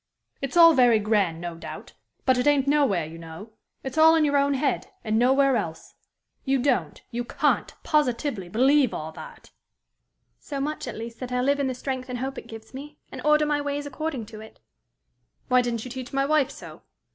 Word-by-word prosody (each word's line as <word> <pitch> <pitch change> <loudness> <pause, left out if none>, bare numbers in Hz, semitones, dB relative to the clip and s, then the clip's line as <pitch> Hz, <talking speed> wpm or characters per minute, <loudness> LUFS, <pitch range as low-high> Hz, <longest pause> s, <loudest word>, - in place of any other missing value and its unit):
"It's 275 +4 -3
all 335 -1 +9
very 245 -5 +5
grand, 205 -6 +1
no 175 0 -5
doubt; 165 - -9 0.3
but 260 -1 +3
it 250 - +1
ain't 285 -2 +3
nowhere, 275 - +2
you 165 +2 -10
know. 165 +7 -10 0.3
It's 265 +4 -3
all 320 +1 +7
in 315 -1 +3
your 285 -1 +1
own 280 0 +3
head, 270 -1 -1 0.2
and 220 0 +1
nowhere 270 +2 +4
else. 165 -8 -4 0.5
You 270 0 +1
don't, 240 - 0
you 240 +1 -2
can't - - 0
positively 250 - 0
believe 260 +5 +3
all 155 +1 -5
that!" 160 - -12 0.9
"So 280 -2 -6
much, 300 +3 -3
at - - -5
least, 230 +1 -8
that 255 -1 -6
I 250 - 0
live 280 +2 +1
in 280 - 0
the 260 - -3
strength 260 0 -4
and 250 - -3
hope 265 +2 -4
it - - -14
gives 225 +1 -11
me, 290 +3 -9
and - - -7
order 300 0 +4
my 295 -1 0
ways 285 0 -3
according 285 -3 -4
to 215 0 -11
it." 220 - -14 0.9
"Why 250 0 +5
didn't 235 -2 -3
you 255 - -8
teach 255 0 -7
my 275 -1 +1
wife 300 -1 +2
so?" - - -11
260 Hz, 205 wpm, -25 LUFS, 225-285 Hz, 0.9 s, all